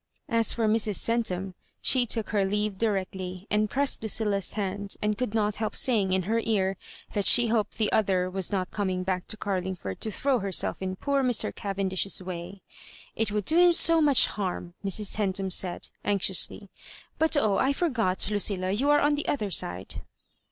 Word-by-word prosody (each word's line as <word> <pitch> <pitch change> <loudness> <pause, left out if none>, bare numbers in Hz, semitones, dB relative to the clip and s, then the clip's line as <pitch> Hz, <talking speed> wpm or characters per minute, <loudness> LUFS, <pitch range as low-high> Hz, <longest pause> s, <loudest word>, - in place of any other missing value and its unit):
As 230 -1 +3
for 225 -2 0
Mrs. 215 -1 +2
Centum, 195 -5 0 0.3
she 250 -2 +3
took 225 -1 -1
her 205 -3 +2
leave 205 0 -1
directly, 190 -3 -3
and 210 0 +1
pressed 280 +4 +1
Lucilla's 210 -3 +1
hand, 200 -1 -4
and 210 0 0
could 230 -1 -3
not 210 -2 0
help 220 -1 -3
saying 210 -7 +1
in 185 0 +1
her 225 +5 0
ear 195 -3 0 0.4
that 205 -2 0
she 240 -2 +5
hoped 220 -2 -1
the 215 -2 0
other 190 -4 +1
was 185 -1 -1
not 185 -2 -2
coming 185 -3 -2
back 185 -1 -3
to 215 - -6
CarUogford 185 - -4
to 220 - -3
throw 260 +4 0
herself 195 -2 -2
in 185 0 -3
poor 280 +7 0
Mr. 245 -4 0
Cavendish's 195 -1 -2
way. 185 +1 -8 0.3
*' - - -21
ft 225 -2 -1
would 210 -2 -2
do 325 - +3
him 350 0 +6
so 330 -1 +6
much 290 -4 +5
harm," 180 -3 -4
Mrs. 200 +1 0
Centum 195 -2 -1
said, 180 0 0
anxiously; 200 0 -1 0.2
" - - -22
but 320 -1 +3
oh 215 -8 +2
I - - +2
I 280 - +2
forgot, 235 - +1
Lucilla, 195 -2 +1
you 255 +9 +1
are 295 0 +5
on 290 +1 +2
the 290 +1 -3
other 210 -8 -1
side." 90 - -3
205 Hz, 190 wpm, -27 LUFS, 190-225 Hz, 0.4 s, him